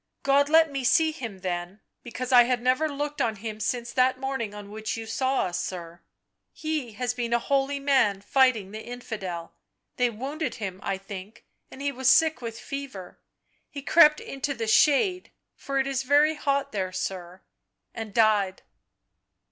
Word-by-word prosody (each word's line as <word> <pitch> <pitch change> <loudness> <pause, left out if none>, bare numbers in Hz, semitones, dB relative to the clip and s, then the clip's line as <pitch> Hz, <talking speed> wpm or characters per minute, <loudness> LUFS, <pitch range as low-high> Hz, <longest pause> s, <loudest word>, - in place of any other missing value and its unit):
God 280 +1 +3
let 320 -1 +5
me 275 -2 -3
see 320 +5 +4
him 230 -11 -7
then, 175 +1 -4 0.2
because 250 +2 -5
I 245 -2 +8
had 250 0 0
never 255 +6 +1
looked 290 +1 -3
on 225 -2 0
him 215 +1 -6
since 235 +2 -2
that 255 0 +2
morning 265 -5 -3
on 205 -1 -10
which 220 +1 -4
you 225 - -6
saw 260 +4 0
us, 175 -1 -2
sir... 170 -2 -7 0.5
he 310 -7 -4
has 245 +3 -2
been 240 -1 -2
a - - +5
holy 275 +3 0
man 260 -8 +2
fighting 230 -3 +2
the 215 +1 -7
infidel; 200 -8 -6 0.4
they 250 -1 +3
wounded 275 +8 -4
him, 195 -5 -5
I 195 - -2
think, 195 +1 -10 0.2
and 270 - -9
he 285 - 0
was 260 -1 +1
sick 320 -1 +4
with 230 -1 -6
fever 270 -10 -7 0.3
— - - -43
he 280 - -8
crept 305 -1 +6
into 275 +1 -4
the 230 -2 -3
shade 305 - +3 0.3
(for 275 0 -4
it 265 - +2
is 270 -1 -1
very 290 +3 +4
hot 280 -2 -1
there, 190 -3 -2
sir),... 185 -1 -5 0.5
and 225 -2 -6
died." 205 -3 +2
245 Hz, 175 wpm, -26 LUFS, 210-275 Hz, 0.5 s, I